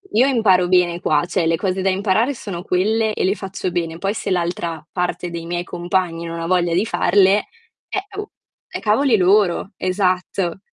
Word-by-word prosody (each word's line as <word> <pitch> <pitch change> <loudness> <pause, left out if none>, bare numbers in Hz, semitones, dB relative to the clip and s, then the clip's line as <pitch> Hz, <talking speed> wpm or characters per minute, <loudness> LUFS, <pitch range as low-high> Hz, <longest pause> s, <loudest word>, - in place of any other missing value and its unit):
io 250 +5 +5
imparo 200 -9 +3
bene 175 -1 +2
qua, 175 - +1
cioè, 175 -1 -1
le 165 0 +2
cose 190 +2 -2
da 195 - +2
imparare 200 +7 +1
sono 195 -8 -6
quelle 215 +4 +1
e - - -2
le 190 +2 +2
faccio 190 -2 -4
bene, 165 -2 -2
poi 195 +3 -1
se 220 - -4
l'altra 170 -3 -2
parte 180 -1 -2
dei 170 -1 -6
miei 175 +1 -3
compagni 175 -1 -2
non 165 0 -5
ha - - -3
voglia 175 -1 +1
di 185 +5 +2
farle, 200 -1 +3 0.4
eh, 390 - -3
oh, 415 0 -6 0.4
è - - -6
cavoli 225 +3 +3
loro." 195 0 +2
Esatto. 185 -1 -1
185 Hz, 185 wpm, -20 LUFS, 175-205 Hz, 0.4 s, io